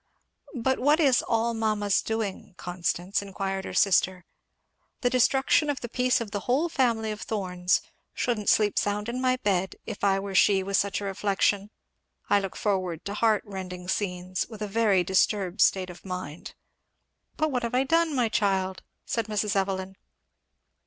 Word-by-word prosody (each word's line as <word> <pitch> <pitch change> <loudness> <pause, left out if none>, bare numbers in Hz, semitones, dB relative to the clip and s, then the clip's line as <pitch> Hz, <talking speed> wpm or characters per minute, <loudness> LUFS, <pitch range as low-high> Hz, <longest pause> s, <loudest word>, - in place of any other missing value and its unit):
"But 260 +2 0
what 295 +5 +3
is 275 -6 +4
'all 230 0 0
mamma's 215 -3 +1
doing,' 220 -4 -4
Constance?" 175 +2 -2
inquired 195 -1 -4
her - - -6
sister. 185 -2 +3 0.8
"The 245 -2 +1
destruction 265 +4 +3
of 285 -2 -2
the 240 - -5
peace 250 +1 +2
of 225 -3 -5
the 205 - -2
whole 295 +7 +2
family 230 -7 +1
of 210 - -6
Thorns 180 -4 0 0.3
shouldn't 230 -5 0
sleep 210 -2 +3
sound 205 +2 -1
in 250 +2 -3
my 255 -1 +3
bed 190 -5 0
if 215 -3 -7
I 195 -1 +3
were 195 0 -5
she 190 0 +4
with 195 +1 -2
such 200 +1 +1
a - - -4
reflection. 200 +1 0 0.6
I 205 - +6
look 195 -2 -5
forward 185 -5 -2
to 200 - -3
heart 215 0 +2
rending 185 -3 -7
scenes, 180 -2 -2
with 215 -2 -7
a - - -2
very 205 -3 +2
disturbed 190 +1 +1
state 185 -2 +3
of 175 - -14
mind." 180 -4 -7 0.8
"But 310 -1 +1
what 250 -2 0
have 235 +1 -2
I 255 - +3
done, 325 +1 +2
my 245 -3 +2
child?" 190 -3 0 0.2
said 230 -1 -2
Mrs. 210 -1 -1
Evelyn. 190 -1 -1
205 Hz, 170 wpm, -27 LUFS, 190-230 Hz, 0.8 s, I